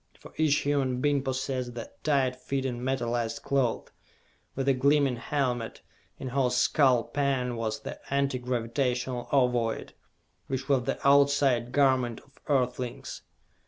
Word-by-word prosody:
For - - -14
each 155 -2 +3
human 135 -3 0
being 145 +1 +2
possessed 130 -2 -3
the 115 - -7
tight 135 -4 +2
fitting 130 -1 -3
metalized 120 -3 -2
cloth, 135 -4 0 0.6
with 135 - -2
the 135 - +4
gleaming 140 -1 +2
helmet 125 -3 -2 0.3
in 130 - -5
whose 125 -1 +1
skull 130 -3 +4
pan 135 -4 -1
was 110 -1 -3
the - - -7
Anti 140 -2 +1
Gravitational 125 0 -2
Ovoid, 125 -4 +1 0.5
which 135 0 -3
was 135 -4 +2
the - - -1
"outside" 140 -4 +4
garment 130 -4 +2
of 135 - -25
earthlings. 125 -3 -2
130 Hz, 130 wpm, -28 LUFS, 125-140 Hz, 0.6 s, the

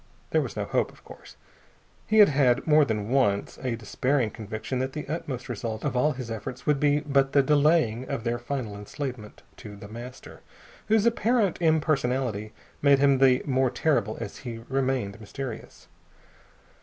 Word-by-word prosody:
There - - +3
was - - -5
no - - -1
hope, - - 0
of - - -21
course. - - -14 0.7
He 220 - +2
had 210 -2 +8
had, 135 -4 +2
more 155 -1 +5
than 110 -5 -2
once, 120 -7 +1
a 125 -3 -1
despairing 120 +2 0
conviction 110 +4 -5
that 130 +1 -2
the 150 - -6
utmost 140 -5 -4
result 110 -2 -4
of - - -1
all 150 +5 +2
his 125 -3 -7
efforts 125 +4 -6
would 150 -2 +2
be 145 0 +3
but 140 -2 +1
the 140 - +5
delaying 145 -4 +2
of 115 - -3
their 120 0 -1
final 120 -4 -4
enslavement 110 +1 -7
to 105 -2 -10
The 100 0 -10
Master, 120 +4 -10 0.5
whose 220 +1 +3
apparent 230 -5 +1
impersonality 135 -9 +1 0.3
made 140 -1 +5
him 140 -1 +4
the 130 -1 +4
more 130 -2 +2
terrible 145 +4 0
as - - -6
he 115 -3 -7
remained 130 -6 -1
mysterious. 120 +2 -8
130 Hz, 170 wpm, -26 LUFS, 115-145 Hz, 0.7 s, had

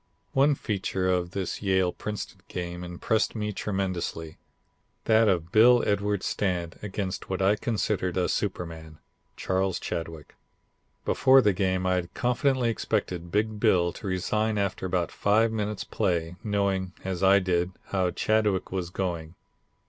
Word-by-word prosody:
"One 140 +2 +4
feature 95 -5 -2
of 90 -1 +1
this 95 0 -4
Yale 95 -3 +2
Princeton 105 -2 -6
game 90 0 -5
impressed 90 +7 -1
me 105 -1 -2
tremendously, 95 -5 -3 0.7
that 110 0 +5
of 85 -3 0
Bill 120 +2 +6
Edwards' 100 -1 0
stand, 90 -4 -2
against 100 -2 -4
what 95 - -2
I 95 +2 +4
considered 100 -5 -1
a 90 - +2
superman, 80 -5 -3 0.4
Charles 95 0 0
Chadwick. 80 -2 -5 0.7
Before 130 +1 +5
the 105 -6 +3
game 95 -1 0
I 90 - +2
had 90 0 -4
confidently 125 0 +1
expected 85 -5 -2
Big 105 +1 0
Bill 85 -3 +3
to 105 - -8
resign 105 +4 0
after 100 -2 -1
about 90 -2 -1
five 110 +2 +2
minutes' 105 -2 -2
play, 85 -1 -1
knowing, 100 -3 0
as 95 -2 -3
I 95 +1 +6
did, 90 -1 0 0.2
how 95 -2 +1
Chadwick 105 0 +1
was 90 -2 -2
going. 85 -3 -3
95 Hz, 140 wpm, -27 LUFS, 90-105 Hz, 0.7 s, Bill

